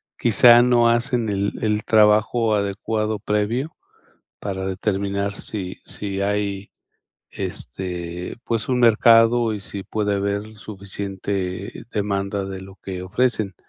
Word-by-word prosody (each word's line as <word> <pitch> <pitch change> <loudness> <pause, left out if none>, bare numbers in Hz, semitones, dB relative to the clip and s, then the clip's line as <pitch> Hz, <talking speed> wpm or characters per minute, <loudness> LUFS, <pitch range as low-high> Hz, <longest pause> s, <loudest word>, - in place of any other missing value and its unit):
quizá 120 +1 +6
no 120 -1 +4
hacen 120 -1 +1
el 100 0 -1
el 105 -1 +1
trabajo 110 +1 +4
adecuado 105 +2 -1
previo 110 +8 -1 0.7
para 95 -2 -4
determinar 100 +1 -2
si 95 -3 -6
si 100 -1 -4
hay, 100 -1 -2 0.6
este, 90 +3 -5
pues, 115 -1 -2
un 125 -1 +1
mercado 115 0 +5
y - - -6
si 100 0 -7
puede 105 +1 -1
haber 100 +2 -2
suficiente 100 -1 -5
demanda 100 -1 -2
de 95 -1 -6
lo 95 0 -12
que 95 -2 -7
ofrecen. 105 0 0
100 Hz, 120 wpm, -22 LUFS, 95-110 Hz, 0.7 s, quizá